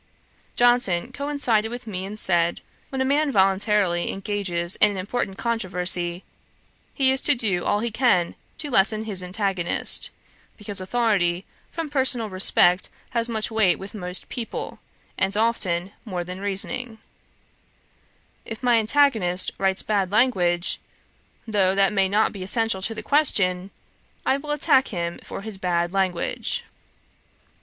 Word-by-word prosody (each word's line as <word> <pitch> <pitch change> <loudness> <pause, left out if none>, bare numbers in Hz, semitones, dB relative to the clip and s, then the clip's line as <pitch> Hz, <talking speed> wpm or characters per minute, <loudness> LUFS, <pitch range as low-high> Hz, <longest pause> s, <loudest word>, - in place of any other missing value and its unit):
Johnson 240 -4 +2
coincided 265 -6 -1
with 245 +1 -7
me 190 -4 -5
and 205 +2 -7
said, 175 -4 +1 0.3
'When 265 -1 -3
a - - +1
man 285 +2 +1
voluntarily 195 -3 +2
engages 195 -3 -3
in 210 - +5
an 200 - -5
important 195 +1 -3
controversy, 180 -5 -2 0.7
he 265 -2 +3
is 265 0 0
to 290 - +4
do 205 -8 +1
all 205 - +1
he 235 0 -2
can 220 -7 +2 0.2
to 295 -2 -2
lessen 215 0 +3
his 205 -4 +2
antagonist, 185 -1 +2 0.5
because 205 -2 -1
authority 190 -4 0 0.3
from 330 -2 -4
personal 260 -6 0
respect 185 -1 +3 0.2
has 235 0 -1
much 220 -1 -1
weight 215 -5 +3
with 195 +1 -8
most 180 -3 -2
people, 235 -2 -6 0.4
and 195 +1 +1
often 195 -5 0
more 185 -6 -4
than 180 +2 -8
reasoning. 220 +4 -1 1.5
If 225 +2 -8
my 240 -2 +4
antagonist 220 -7 +2
writes 190 0 +1
bad 195 -3 0
language, 185 -7 +2 0.7
though 195 -3 +2
that 195 +1 +3
may 195 -2 +2
not 210 +2 +2
be 200 - -8
essential 225 +1 +1
to 225 +4 -2
the 215 - -6
question, 195 -10 +1 0.6
I 270 - +2
will 295 +1 -10
attack 280 -2 +3
him 170 -3 -4
for - - -7
his 205 -2 -7
bad 175 -1 -1
language.' 185 -3 -1
205 Hz, 140 wpm, -23 LUFS, 185-235 Hz, 1.5 s, in